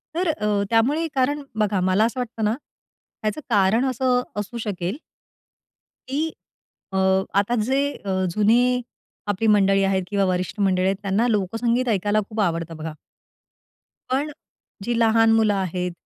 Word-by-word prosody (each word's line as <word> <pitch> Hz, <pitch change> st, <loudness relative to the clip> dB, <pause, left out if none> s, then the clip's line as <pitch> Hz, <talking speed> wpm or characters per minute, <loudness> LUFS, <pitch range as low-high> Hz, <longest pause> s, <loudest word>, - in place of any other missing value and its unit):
तर 360 Hz, +1 st, 0 dB
अ, 210 Hz, -9 st, 0 dB
त्यामुळे 275 Hz, +9 st, +2 dB
कारण 285 Hz, +3 st, +1 dB, 0.2 s
बघा 210 Hz, -2 st, +1 dB
मला 195 Hz, +4 st, +3 dB
असं 235 Hz, +3 st, -2 dB
वाटतं 230 Hz, -2 st, -4 dB
ना, 210 Hz, -, +2 dB, 0.7 s
ह्याचं 215 Hz, +7 st, -2 dB
कारण 215 Hz, +3 st, +3 dB
असं 255 Hz, 0 st, +1 dB
अ, 210 Hz, -, -8 dB
असू 205 Hz, +3 st, -5 dB
शकेल 190 Hz, +2 st, -3 dB, 1.1 s
की 295 Hz, +4 st, 0 dB, 0.7 s
अ, -, -, 0 dB, 0.4 s
आता 205 Hz, +4 st, 0 dB
जे 270 Hz, +1 st, +2 dB
अ, 190 Hz, -1 st, -2 dB
जुने 245 Hz, +5 st, +3 dB, 0.5 s
आपली 205 Hz, +2 st, 0 dB
मंडळी 195 Hz, -2 st, +4 dB
आहेत 195 Hz, -1 st, +1 dB
किंवा 200 Hz, -1 st, +1 dB
वरिष्ठ 185 Hz, +2 st, -2 dB
मंडळी 185 Hz, -2 st, +2 dB
आहेत, 195 Hz, +1 st, +2 dB
त्यांना 205 Hz, +4 st, +1 dB
लोकसंगीत 230 Hz, +4 st, 0 dB
ऐकायला 205 Hz, 0 st, +1 dB
खूप 220 Hz, 0 st, -5 dB
आवडतं 165 Hz, -3 st, -1 dB
बघा. 160 Hz, 0 st, -5 dB, 1.2 s
पण 275 Hz, +4 st, 0 dB
अ, -, -, -9 dB, 0.5 s
जी 240 Hz, +3 st, -1 dB
लहान 225 Hz, 0 st, +4 dB
मुलं 220 Hz, -2 st, +3 dB
आहेत 180 Hz, -2 st, -2 dB
210 Hz, 150 wpm, -23 LUFS, 195-240 Hz, 1.2 s, मंडळी